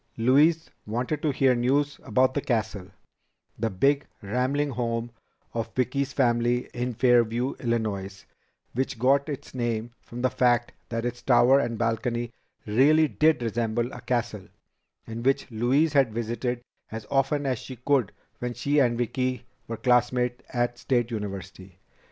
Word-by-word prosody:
Louise 150 +8 +4 0.2
wanted 125 +7 -2
to 155 - +1
hear 135 -1 +3
news 140 +4 +1
about 130 0 +2
The 145 - -1
Castle, 110 -7 -2 0.7
the 115 +1 0
big 140 +9 +1 0.2
rambling 130 +7 0
home 115 -1 -2 0.4
of 115 -1 -3
Vicki's 135 +2 0
family 120 -2 +1
in 125 0 -3
Fairview, 120 +1 +3
Illinois, 105 -5 -2 0.5
which 130 -1 -2
got 140 +5 +2
its 145 - -6
name 120 -2 -2
from 120 +1 -8
the 130 - +4
fact 120 -1 +2 0.2
that 115 0 -2
its 120 0 -4
tower 125 +1 +5
and 120 -4 -2
balcony 120 +1 -1 0.3
really 145 +9 +4
did 155 -3 +2
resemble 115 +1 -1
a - - -8
castle, 120 -5 -2 0.6
and 115 +1 -6
which 135 0 +1
Louise 130 +8 +2
had 135 -5 +4
visited 120 +1 -2 0.3
as 110 -1 -6
often 140 +1 +1
as 130 -4 0
she 130 - -8
could 125 -2 +1 0.3
when 120 0 -4
she 145 +1 +1
and 120 -4 +3
Vicki 125 +1 -2 0.2
were 115 - -4
classmates 125 0 +1
at 120 0 -1
State 120 -2 0
University. 95 -3 -6
120 Hz, 145 wpm, -26 LUFS, 115-130 Hz, 0.7 s, tower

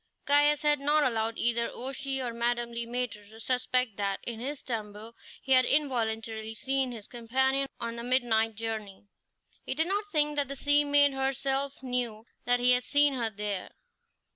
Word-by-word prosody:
Caius 290 +1 +4
had 295 -1 +3
not 295 +2 +3
allowed 225 -3 -1
either 235 0 +1
O'Shea 270 +1 -3
or 240 -2 -3
Madame 235 0 -1
Le 235 0 -4
Maître 235 -4 -4
to 220 +1 -14
suspect 250 -2 0
that 200 -1 -1
in 230 -2 -5
his 275 +4 -4
stumble 220 -1 -6 0.3
he 265 - -5
had 255 -1 +7
involuntarily 225 -6 -1
seen 265 +2 +1
his 220 -4 -8
companion 265 +3 0
on 235 0 -3
the 235 - -5
midnight 235 -3 +1
journey. 215 -3 -6 0.6
He - - -3
did 320 +3 +1
not 400 +4 -1
think 295 -2 +2
that 285 -1 +3
the 275 - -5
sea 290 +2 +4
maid 285 -1 +4
herself 270 +1 -2
knew 240 -4 -2 0.2
that 245 0 +3
he 250 +1 +4
had 250 0 +4
seen 285 +2 +4
her 235 -4 -1
there. 205 -2 -4
245 Hz, 175 wpm, -29 LUFS, 225-275 Hz, 0.6 s, had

